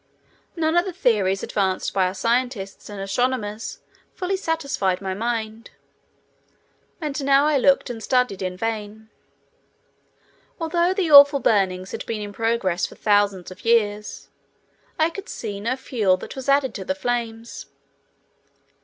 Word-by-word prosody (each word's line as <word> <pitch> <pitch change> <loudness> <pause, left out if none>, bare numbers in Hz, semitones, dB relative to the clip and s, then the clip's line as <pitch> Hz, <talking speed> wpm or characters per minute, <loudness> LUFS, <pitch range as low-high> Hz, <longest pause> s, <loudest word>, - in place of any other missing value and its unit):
None 320 -1 0
of 345 +2 +3
the 375 - -5
theories 205 - +1
advanced 190 -2 -1
by 190 -2 +2
our 185 - -5
scientists 230 -3 -2
and 205 -1 -7
astronomers 215 +1 -2 0.3
fully 370 +1 -1
satisfied 280 - -1
my 190 -1 -3
mind. 225 +1 -3 1.3
And 295 -3 -3
now 275 +1 +4
I 300 -2 +3
looked 275 +1 +3
and 225 -2 -7
studied 250 -5 +1
in 185 -1 -3
vain. 220 0 -4 1.5
Although 340 +2 +1
the 360 -5 0
awful 285 0 +9
burnings 190 -5 +1
had - - -5
been 215 -2 -3
in 205 0 -7
progress 225 -5 0
for - - -14
thousands 205 -3 +1
of 185 - -12
years, 210 -3 0 0.7
I 320 +1 +2
could 395 +3 -8
see 205 -3 -5
no 230 +5 -1
fuel 215 -8 +1
that - - -9
was 265 0 -5
added 275 -3 +3
to 195 - -6
the 190 - -2
flames. 230 +1 -4
225 Hz, 145 wpm, -23 LUFS, 200-275 Hz, 1.5 s, awful